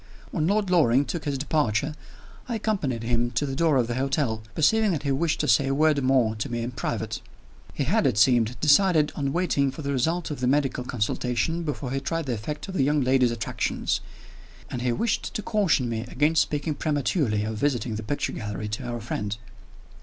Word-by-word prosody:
When 155 -3 0
Lord 200 -1 +1
Loring 145 -6 +4
took 170 +1 -4
his 140 -2 -1
departure, 145 -1 0 0.6
I 235 - -1
accompanied 190 - -1
him 120 +1 +1
to 135 +5 0
the 135 -1 -4
door 160 -1 +3
of 125 - +3
the 120 - -3
hotel, 130 -3 0
perceiving 220 +7 +3
that 150 -3 -3
he 140 - 0
wished 160 +3 0
to - - -1
say 130 +4 +4
a 135 - +1
word 155 -1 +3
more 130 -4 +3
to 105 - -3
me 120 -1 -2
in 120 - -3
private. 120 - -3 0.5
He - - 0
had, - - +2
it - - 0
seemed, 120 0 +3
decided 155 0 +4
on 140 -2 -1
waiting 145 -5 +1
for 135 +3 -7
the 140 - -2
result 160 +6 0
of 145 - -5
the 125 - 0
medical 135 -2 +1
consultation 125 +7 -1
before 145 -5 -4
he 135 - 0
tried 165 +3 -2
the 130 - -1
effect 120 - -5
of 190 - -6
the 165 - +2
young 145 +2 +2
lady's 130 -1 +3
attractions; 115 -2 -2 0.7
and 125 - -3
he 125 0 +1
wished 230 - -1
to 215 - -2
caution 195 - +2
me 115 -1 -2
against 150 +5 +2
speaking 150 +1 -1
prematurely 145 - 0
of 110 0 -3
visiting 130 -3 0
the 110 - -3
picture 125 +7 -2
gallery 105 0 -4
to 105 - -4
our 120 -1 -4
friend. 105 -1 -3
135 Hz, 205 wpm, -25 LUFS, 120-155 Hz, 0.7 s, Loring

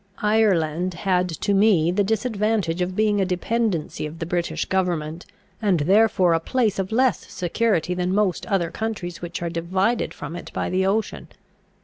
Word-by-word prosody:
Ireland 185 -5 +2
had 180 0 0
to 170 +5 -1
me 195 -5 +4
the 200 +3 +1
disadvantage 210 -4 0
of 180 +1 -2
being 210 -1 +2
a - - +3
dependency 185 -4 -1
of 155 +2 -10
the 165 - -4
British 175 0 -2
government, 175 -3 -2 0.3
and 190 -7 +2
therefore 190 0 +4
a 165 - +2
place 215 +2 0
of 190 +1 -2
less 250 0 +1
security 180 -1 0
than 180 0 -1
most 195 -3 0
other 185 -6 0
countries 200 -6 -4
which 175 0 -5
are 170 - -1
divided 185 +7 0
from 150 +3 -7
it 175 - -8
by - - -2
the 190 +1 +1
ocean. 215 +3 -1
185 Hz, 165 wpm, -23 LUFS, 170-210 Hz, 0.3 s, me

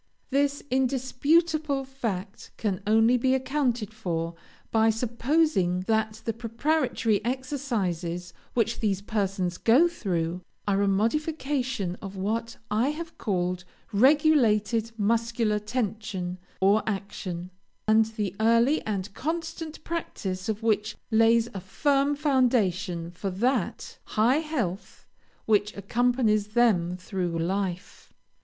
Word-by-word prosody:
This 280 +1 +1
indisputable 275 +3 +1
fact 225 -8 -5
can 205 -3 -1
only 225 +3 +5
be 260 +2 +2
accounted 255 -5 -1
for 170 -6 -3 0.4
by 225 0 +4
supposing 235 - +1
that 220 +2 -1
the 225 - 0
preparatory 235 -1 0
exercises 205 - -2 0.2
which 230 -1 +1
these 200 -4 0
persons 195 -4 -1
go 260 +10 +5
through, 180 - -2 0.3
are 200 -1 +2
a 200 - +2
modification 255 - 0
of 195 0 -7
what 225 +4 -2
I 220 +5 +2
have 325 +2 -6
called 180 -3 -1 0.3
regulated 230 -4 +4
muscular 225 0 +1
tension, 210 -5 -3 0.2
or 200 +3 +4
action, 185 -3 -4 0.4
and 220 +1 +5
the 210 -4 -3
early 230 +7 +3
and 200 -1 -3
constant 325 +2 -4
practice 195 - -4
of 220 +1 -2
which 215 -1 +1 0.2
lays 225 +1 +4
a 195 - -4
firm 280 - +1
foundation 210 - +1
for 185 +3 -4
that 225 +2 -1
high 235 +6 +3
health 245 - -4 0.4
which 210 -1 +2
accompanies 220 0 +1
them 210 -6 +2
through 180 -2 -3
life. 185 +2 -3
220 Hz, 110 wpm, -27 LUFS, 195-260 Hz, 0.4 s, only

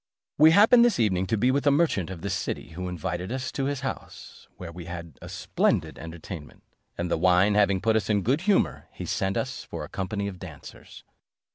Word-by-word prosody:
We 155 +1 +9
happened 220 +7 +7
this 240 -6 +3
evening 95 -4 +1
to 110 - 0
be 125 +5 +3
with 140 +2 0
a - - +8
merchant 140 - +2
of 90 -3 -7
this - - -2
city, - - -3
who 90 +3 -6
invited 90 +2 -4
us 130 0 -3
to 135 - -2
his 140 -1 -2
house, 135 - -7
where 85 - -7
we 85 0 -9
had 85 -4 -8
a - - -9
splendid - - 0
entertainment: 80 -1 -9 0.3
and 85 0 -3
the - - +1
wine 90 +3 +4
having 100 -2 +3
put 110 0 +2
us 110 -2 0
in 105 -2 +2
good 135 - +1
humour, 200 +1 +1
he - - -7
sent 95 0 -1 0.3
for - - -5
a - - -8
company 100 +2 -3
of 95 -3 -7
dancers. 80 -6 -11
100 Hz, 210 wpm, -26 LUFS, 90-130 Hz, 0.3 s, We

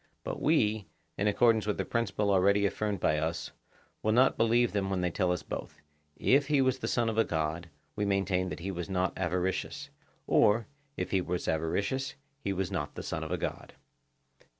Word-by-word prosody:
But - - -4
we, 110 - +2 0.3
in 100 - 0
accordance 110 +1 +3
with 105 - 0
the - - -1
principle 105 -3 0
already 100 +2 +4
affirmed 105 0 -1
by 75 -2 +2
us, 80 +2 -3 0.5
will 110 - +1
not 130 +3 +5
believe 120 +1 +3
them 100 -2 -1
when 95 -2 0
they 90 -1 0
tell 90 0 +1
us 90 - -2
both;—if 75 - -2
he 145 -2 +3
was 130 -1 +2
the - - -3
son 120 -2 +1
of 110 0 0
a - - +6
god, 80 0 -2 0.3
we 105 - -1
maintain 95 -2 +1
that - - -6
he 95 +3 -3
was 90 0 -5
not 95 -1 0
avaricious; 90 -4 -2 0.3
or, 110 +1 +4 0.3
if 90 0 -3
he 95 - +2
was 90 0 -3
avaricious, 100 - -1 0.3
he 100 - -1
was 95 0 -2
not 75 -6 -3
the - - -6
son - - -3
of - - -5
a - - 0
god. - - -5
100 Hz, 195 wpm, -30 LUFS, 90-110 Hz, 0.5 s, a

